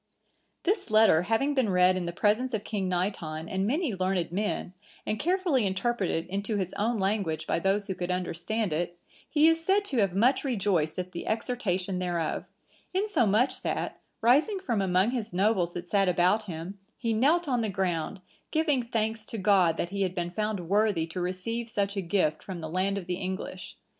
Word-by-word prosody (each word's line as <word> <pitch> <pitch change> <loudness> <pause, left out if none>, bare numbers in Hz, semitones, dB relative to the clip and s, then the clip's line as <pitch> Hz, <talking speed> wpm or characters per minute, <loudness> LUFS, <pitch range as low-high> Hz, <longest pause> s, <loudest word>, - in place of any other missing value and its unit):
This 390 - 0
letter 215 -7 +5
having 225 +10 +1
been 260 -6 +2
read 180 0 +4
in 180 -2 -2
the - - -2
presence 215 +7 +1
of 205 - -3
King 200 -4 -2
Naiton 175 -4 -2
and 190 +2 -1
many 290 - 0
learned 185 -2 -1
men, 200 -1 -2 0.3
and 215 - -2
carefully 350 - +1
interpreted 190 -3 0
into 200 +4 -3
his 185 -2 -2
own 225 +3 0
language 195 -5 -1
by - - 0
those 195 +3 +1
who 190 - -3
could 180 -1 -4
understand 180 +2 -1
it, 175 +2 -2 0.3
he 305 +1 +5
is 325 0 +3
said 395 +3 +2
to 265 -10 -1
have 195 -3 +2
much 245 +7 +3
rejoiced 195 - 0
at 180 0 -4
the 170 - -6
exhortation 200 -5 -1
thereof; 175 -3 -2 0.5
insomuch 255 - +2
that, - - -3 0.2
rising 285 - +4
from 235 - -1
among 190 +3 +2
his 235 -7 -3
nobles 185 -2 +2
that 175 0 -6
sat 195 0 +2
about 180 +5 +2
him, 180 +2 -6 0.2
he 230 -2 -1
knelt 300 +9 +3
on 250 -3 +1
the 220 - -1
ground, 185 -1 -2 0.3
giving 310 -5 +2
thanks 225 -2 -2
to 225 - -5
God 185 -5 +3
that 175 - -2
he 200 0 -2
had 185 -1 0
been 175 -1 -2
found 210 -3 -2
worthy 200 -3 +2
to 165 +2 -5
receive 225 +6 -3
such 200 -2 -1
a 195 - -1
gift 170 -4 0
from 185 -3 -6
the 160 -1 -5
land 190 +3 0
of 190 - -5
the 180 0 -2
English. 190 +1 -5
200 Hz, 190 wpm, -28 LUFS, 180-230 Hz, 0.5 s, letter